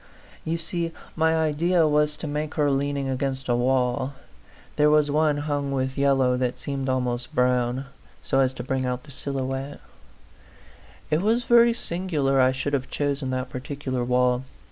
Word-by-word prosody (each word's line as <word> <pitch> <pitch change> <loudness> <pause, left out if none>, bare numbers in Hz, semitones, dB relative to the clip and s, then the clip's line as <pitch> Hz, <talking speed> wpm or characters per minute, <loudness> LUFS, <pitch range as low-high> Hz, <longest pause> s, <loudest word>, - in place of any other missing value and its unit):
You 165 +1 -1
see 165 0 -3 0.2
my 160 0 +2
idea 160 +2 +2
was 150 0 +2
to 160 - -7
make 150 +1 -3
her 145 -2 +2
leaning 140 0 -1
against 135 0 -2
a 120 - +2
wall 125 +1 +1 0.6
there 150 0 +4
was 150 -1 +3
one 150 0 +2
hung 145 -1 -2
with 130 -1 -1
yellow 135 -2 +3
that 125 -1 -1
seemed 135 -1 -3
almost 125 +3 -2
brown 125 +1 +1 0.4
so 135 - +1
as 130 -1 +3
to 125 - -5
bring 130 +1 -1
out 125 0 -2
the 150 - -14
silhouette. 135 0 -4
A - - -14
PHANTOM - - -27 0.5
LOVER.. - - -27
5 155 - +3
It - - -2
was 225 +4 +2
very 235 0 +5
singular 165 - 0
I 130 0 +5
should 135 +2 -3
have 130 -2 -1
chosen 140 -2 -1
that 130 0 -3
particular 130 -1 -4
wall. 125 0 +2
140 Hz, 180 wpm, -25 LUFS, 130-150 Hz, 0.6 s, very